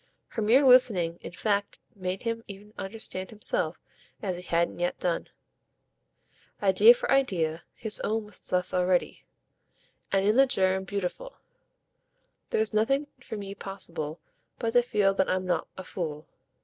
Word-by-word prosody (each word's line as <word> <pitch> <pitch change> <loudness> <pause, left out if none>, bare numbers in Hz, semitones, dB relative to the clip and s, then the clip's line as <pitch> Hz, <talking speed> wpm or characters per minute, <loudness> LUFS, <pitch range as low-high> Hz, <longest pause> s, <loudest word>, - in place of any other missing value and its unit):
Her 225 - -4
mere 245 +7 +5
listening 200 -10 +5
in - - -8
fact 200 +1 -1 0.2
made 185 -1 -4
him 230 -1 -2
even 205 +1 -11
understand 195 -2 -5
himself 230 - -1 0.4
as 185 -4 -3
he - - -6
hadn't 170 0 0
yet 175 0 -1
done. 175 -2 -1 1.3
Idea 205 +4 +7
for - - -3
idea, 175 -12 +1
his 220 -2 +1
own 220 0 -1
was 210 - -9
thus 180 0 0
already, 180 0 0 0.8
and 195 0 +2
in 210 +4 +3
the 270 0 +6
germ, 190 -4 +1
beautiful. 200 - -4 1.1
"There's 220 0 +1
nothing 275 +7 +1
for 225 -3 -7
me 200 -1 -6
possible 170 -6 -6 0.4
but 230 - -1
to 245 - +6
feel 210 -5 +2
that 190 -1 +1
I'm 185 0 0
not 175 -3 0
a 190 - -6
fool. 155 -5 -5
195 Hz, 150 wpm, -28 LUFS, 180-225 Hz, 1.3 s, Idea